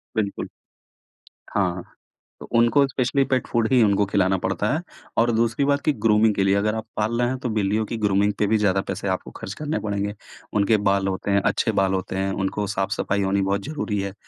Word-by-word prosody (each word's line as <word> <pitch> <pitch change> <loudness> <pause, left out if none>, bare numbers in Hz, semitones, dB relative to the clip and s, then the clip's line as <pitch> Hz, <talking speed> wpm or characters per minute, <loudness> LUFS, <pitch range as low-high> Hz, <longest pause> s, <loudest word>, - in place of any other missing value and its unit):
बिल्कुल। 100 -2 -2 1.1
हाँ, 90 -3 0 0.6
तो - - -10
उनको 120 +4 +4
स्पेशली 135 +1 +1
पेट 130 -2 0
फ़ूड 115 -1 +1
ही 125 -2 +5
उनको 100 -1 +3
खिलाना 95 -1 +1
पड़ता 95 +3 -1
है। 160 - -1 0.4
और 120 +1 +3
दूसरी 115 +4 +1
बात 140 0 +2
कि 150 - +3
ग्रूमिंग 105 0 +4
के 95 - +1
लिए 100 0 +3
अगर 105 +2 +1
आप 110 - -4
पाल 110 +2 0
रहे 120 - +2
हैं 130 - -2
तो - - +1
बिल्लियों 105 0 0
की 115 - -4
ग्रूमिंग 105 -1 +2
पे 105 - +2
भी 110 +2 +3
ज़्यादा 100 -2 +2
पैसे - - -3
आपको - - -10
खर्च 95 - -6
करने 155 +1 -1
पड़ेंगे। 100 0 -3 0.5
उनके 110 +2 +3
बाल 100 0 +1
होते 95 +1 -2
हैं, 100 0 +3
अच्छे - - +1
बाल 95 0 +1
होते 95 0 -3
हैं, 95 0 0
उनको 95 +1 -2
साफ-सफाई 95 +1 -1
होनी 100 +1 +1
बहुत 100 +1 0
ज़रूरी 135 -9 -3
है, 100 -1 -4
105 Hz, 210 wpm, -23 LUFS, 95-115 Hz, 1.1 s, ही